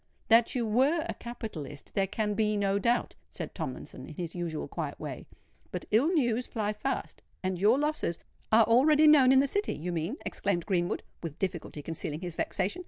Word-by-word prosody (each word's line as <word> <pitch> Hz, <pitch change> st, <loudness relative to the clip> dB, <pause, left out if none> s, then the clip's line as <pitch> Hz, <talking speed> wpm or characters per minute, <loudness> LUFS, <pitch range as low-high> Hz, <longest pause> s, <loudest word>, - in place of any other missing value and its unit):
"That 230 Hz, +2 st, +5 dB
you 240 Hz, -2 st, +1 dB
were 270 Hz, +9 st, +2 dB
a -, -, -3 dB
capitalist, 180 Hz, -, -7 dB
there 195 Hz, -1 st, +1 dB
can 210 Hz, +1 st, -1 dB
be 210 Hz, 0 st, +1 dB
no 200 Hz, 0 st, +1 dB
doubt," 235 Hz, +4 st, +1 dB, 0.2 s
said -, -, -6 dB
Tomlinson, -, -, -6 dB
in -, -, -10 dB
his 170 Hz, -3 st, -5 dB
usual 170 Hz, -3 st, -3 dB
quiet -, -, -5 dB
way; -, -, -6 dB, 0.4 s
"but -, -, -4 dB
ill 230 Hz, +8 st, +4 dB
news 245 Hz, -7 st, +1 dB
fly 215 Hz, -2 st, -2 dB
fast—and 190 Hz, -5 st, -4 dB
your 215 Hz, +5 st, +5 dB
losses——" 295 Hz, -, -1 dB, 0.3 s
"Are 225 Hz, +1 st, +7 dB
already 290 Hz, +7 st, +5 dB
known 285 Hz, -4 st, +7 dB
in 265 Hz, 0 st, +7 dB
the 280 Hz, -, +1 dB
City, 405 Hz, +9 st, 0 dB
you 175 Hz, +4 st, -4 dB
mean?" 170 Hz, -, -2 dB
exclaimed 190 Hz, -4 st, -1 dB
Greenwood, 175 Hz, -4 st, 0 dB, 0.2 s
with 165 Hz, -2 st, -6 dB
difficulty 170 Hz, -5 st, -4 dB
concealing 160 Hz, -1 st, -4 dB
his 175 Hz, -3 st, -5 dB
vexation. 205 Hz, -, -1 dB
210 Hz, 180 wpm, -29 LUFS, 175-255 Hz, 0.4 s, Are